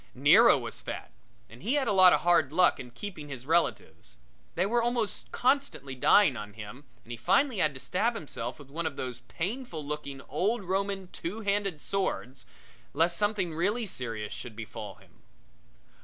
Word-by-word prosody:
Nero - - +7
was - - -6
fat, - - -6 0.4
and 115 +2 -15
he 235 +9 0
had 275 -3 +1
a - - +2
lot 185 -2 +8
of - - +3
hard 170 -5 +3
luck 180 +3 +4
in 125 - -8
keeping 150 +2 -8
his 130 -2 -7
relatives 140 - -1 0.4
they 180 - +2
were 235 +4 +2
almost 235 -4 -2
constantly 255 - 0
dying 145 +4 +5
on 105 -2 -7
him 110 +6 -10 0.2
and 120 - -11
he 120 - -5
finally 200 - +2
had 150 -5 +2
to - - -7
stab 220 - 0
himself 130 - -5
with 140 -2 -14
one 165 +2 -2
of - - -5
those 125 -2 -5
painful 180 - -4
looking 145 -2 -5
old 195 - -1
Roman 195 0 -2
two 195 +7 -5
handed 200 -6 -1
swords, 130 -10 -3 0.5
lest 170 +3 +2
something 205 -4 0
really 205 +9 0
serious 115 - -4
befall 110 -3 -8
him. - - -23
170 Hz, 170 wpm, -29 LUFS, 130-200 Hz, 0.5 s, lot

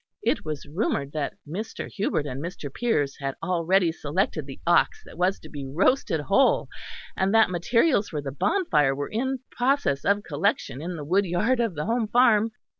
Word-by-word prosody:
It - - +1
was 155 -2 -5
rumoured 145 -3 -2
that 150 -2 -3
Mr. 205 +9 -5
Hubert 195 -7 -1
and 135 -1 -5
Mr. 155 -4 -6
Piers 145 -13 0
had 135 -1 -3
already 180 0 +2
selected 155 -1 -2
the 135 - -9
ox 170 0 +3
that - - -13
was 180 +3 +1
to - - -11
be 145 -2 -7
roasted 160 - +1
whole, 200 - +3 0.5
and 190 +3 +1
that 225 -4 +5
materials 220 - +2
for 155 - -3
the 140 -1 -5
bonfire 150 - +1
were 145 +1 -4
in 260 +3 -1
process 250 - +1
of 200 +1 +2
collection 155 - -1
in 175 +2 -4
the 150 -3 -6
woodyard 195 - +1
of 230 -7 0
the 150 - -3
home 230 +1 0
farm. 225 -2 +4
180 Hz, 180 wpm, -25 LUFS, 145-225 Hz, 0.5 s, that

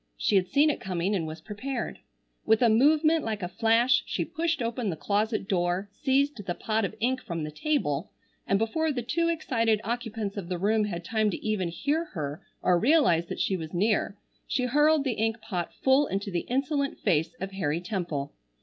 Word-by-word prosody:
She 200 - +1
had 185 -1 +3
seen 295 +6 +4
it - - -6
coming 185 +1 -1
and 170 -5 -1
was 155 +1 -7
prepared. 235 +6 -5 0.4
With 220 +2 +3
a 235 - +6
movement 310 +7 +4
like 215 -3 -3
a - - -1
flash 230 +6 +3
she - - -1
pushed 335 -1 -1
open 230 -2 -2
the 170 - -2
closet 210 +3 -1
door, 180 0 0
seized 270 -2 +1
the 175 -2 -3
pot 220 0 -1
of - - -5
ink 255 +3 0
from 170 -5 -4
the 150 - -4
table, 160 - -1 0.4
and 195 - +3
before 305 +10 0
the 245 -4 -3
two 335 +8 0
excited 230 -10 +1
occupants 225 -3 -3
of 185 -3 -5
the 180 - -1
room 210 +4 +2
had 175 -4 -5
time 220 0 +1
to - - -5
even 210 -4 0
hear 290 - -1
her 145 -2 -4 0.2
or 180 -1 +4
realize 230 - +4
that - - -5
she 190 - +1
was 160 -2 -6
near, 205 +1 +1 0.3
she 255 - 0
hurled 295 +3 +4
the 265 - 0
ink 225 +1 -1
pot 180 -5 -4
full 270 +2 +3
into 200 +1 -3
the 175 -1 -2
insolent 275 +2 0
face 160 +8 0
of 195 0 -4
Harry 165 -5 -1
Temple. 175 -7 -3
215 Hz, 200 wpm, -27 LUFS, 180-260 Hz, 0.4 s, a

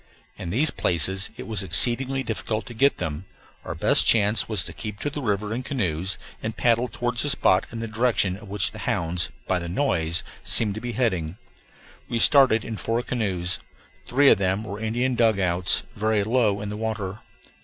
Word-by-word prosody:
In - - -7
these 140 - +2
places 95 +3 +1
it - - -7
was 110 -4 -3
exceedingly 125 +9 +2
difficult 110 -1 -3
to 120 - -9
get 140 +5 +2
them; 80 +3 -5 0.4
our - - -6
best - - +3
chance 105 0 +3
was 105 -5 +2
to - - -9
keep 105 -2 -7
to 145 - -2
the 145 - -5
river 105 -2 -2
in 120 - -3
canoes, 95 - -2 0.2
and 110 +1 -5
paddle 120 +1 +2
toward 120 0 -4
the 145 - +1
spot 95 -8 +3
in 115 0 -6
the 115 - -4
direction 110 -4 +1
of 105 +2 -12
which 100 -1 0
the - - -10
hounds, 85 0 0 0.2
by 90 - 0
the 85 0 -6
noise, 85 - 0 0.2
seemed 105 -3 +3
to 110 - -7
be 120 -1 -5
heading. 95 -8 -1 0.7
We 120 - -1
started 130 -3 +5
in 110 - -5
four 115 +3 -2
canoes. 95 -8 -2 0.5
Three 140 +2 +5
of - - +4
them 95 +2 0
were 105 -1 -7
Indian 120 +4 -1
dugouts, 95 -7 +3
very 110 -1 0
low 110 -3 +1
in 105 - -5
the 105 - -5
water. 110 -2 -4
110 Hz, 190 wpm, -24 LUFS, 95-120 Hz, 0.7 s, started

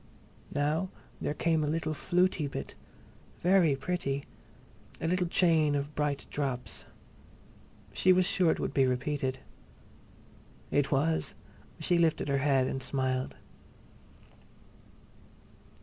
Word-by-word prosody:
Now 150 +6 0 0.3
there 150 - -1
came 160 -1 +1
a - - 0
little 155 0 -1
"flutey" 180 -1 +1
bit—very 170 - -1
pretty!—a 140 0 -6
little 180 +1 +1
chain 160 -4 +3
of 145 +1 -2
bright 145 -2 -1
drops. 135 -4 -3 1.1
She 185 - +4
was 185 0 +4
sure 180 -2 +2
it - - +1
would - - -2
be 135 -2 +4
repeated. 130 +1 -1 1.3
It 145 -1 +2
was; 155 +3 +1 0.4
she 175 -1 +2
lifted 160 -3 +2
her 140 0 +2
head 135 -2 +3
and 135 - -3
smiled. 130 -1 -1
150 Hz, 105 wpm, -30 LUFS, 135-170 Hz, 1.3 s, She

